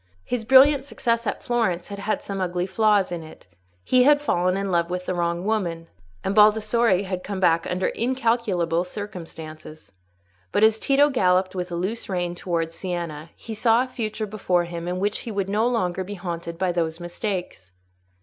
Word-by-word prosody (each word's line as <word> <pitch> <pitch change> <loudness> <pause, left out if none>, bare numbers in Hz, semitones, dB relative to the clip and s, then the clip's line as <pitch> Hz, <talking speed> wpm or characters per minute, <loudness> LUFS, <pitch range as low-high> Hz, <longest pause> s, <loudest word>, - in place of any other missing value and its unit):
His 240 -3 -3
brilliant 270 +3 +6
success 235 -4 -1
at - - -3
Florence 215 -8 0
had 200 0 -6
had 210 +2 -2
some 195 -1 -4
ugly 180 -1 -1
flaws 205 -1 +2
in 175 -1 -3
it: 160 0 -13 0.4
he 255 - +4
had 290 +3 +6
fallen 185 -10 +1
in 195 -1 -2
love 170 -1 +1
with 180 0 -3
the - - -1
wrong 170 +1 -1
woman, 175 -6 -2 0.3
and 195 - -1
Baldassarre 215 -1 +4
had 185 -1 -4
come 200 -1 -4
back 170 -3 +3
under 185 +1 0
incalculable 225 -9 0
circumstances. 160 - -9 0.6
But 210 - +2
as 220 0 +5
Tito 285 +3 +3
galloped 185 -5 +2
with 180 -1 -4
a - - -2
loose 195 +7 -3
rein 175 -2 -1
towards 170 -2 -2
Siena, 170 -4 -5
he 225 - -8
saw 225 +2 +3
a - - -6
future 220 -3 -4
before 195 -4 0
him 170 0 -6
in 180 +1 -2
which 205 +2 0
he 230 - -6
would 200 -2 -2
no 215 +3 +2
longer 185 -6 0
be 205 +2 -7
haunted 170 -2 -5
by 185 0 0
those 165 -1 -2
mistakes. 175 - -5
190 Hz, 185 wpm, -24 LUFS, 175-220 Hz, 0.6 s, brilliant